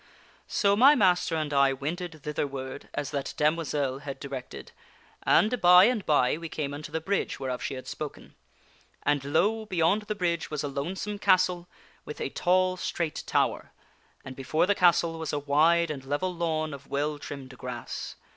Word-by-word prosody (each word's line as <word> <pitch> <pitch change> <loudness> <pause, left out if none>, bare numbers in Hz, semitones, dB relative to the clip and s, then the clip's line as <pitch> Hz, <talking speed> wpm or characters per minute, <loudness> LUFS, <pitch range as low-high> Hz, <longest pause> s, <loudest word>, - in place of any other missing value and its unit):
" - - -31
So 200 0 +2
my 270 +7 +7
master 180 - +2
and 155 -2 -2
I 140 -1 +4
wended 155 +3 -5
thitherward 140 -3 -4
as 140 - -3
that 140 -1 -4
damoiselle 150 -3 0
had 140 -1 -7
di 140 - -7
rected, 130 -2 -7 0.5
and, 230 +3 +3
by 180 +1 +8
and 220 -1 +2
by, 145 0 +3
we 165 -1 -6
came 145 -3 -3
unto 150 +1 -7
the 160 - -1
bridge'whereof 135 -8 -2
she - - -3
had 130 - -8
spoken. 150 -2 -7 0.7
And, 145 -2 +1
lo! 205 +10 +1
beyond 180 +2 +2
the 210 - -2
bridge 170 -4 -1
was 150 -2 -3
a - - -1
lonesome 185 +9 -4
castle 180 -2 +2 0.4
with 150 - -8
a - - -2
tall 185 +1 +2
straight 170 -3 -3
tower, - - 0 0.5
and 130 - -8
before 145 +5 +1
the 205 - +3
castle 170 -3 +3
was 160 -2 -4
a - - +1
wide 155 +4 +3
and 140 -3 -6
level 145 +7 -2
lawn 160 -3 -2
of 140 0 -10
well 145 +1 -2
trimmed 135 -3 -8
grass. 125 -2 -6
155 Hz, 175 wpm, -27 LUFS, 140-180 Hz, 0.7 s, by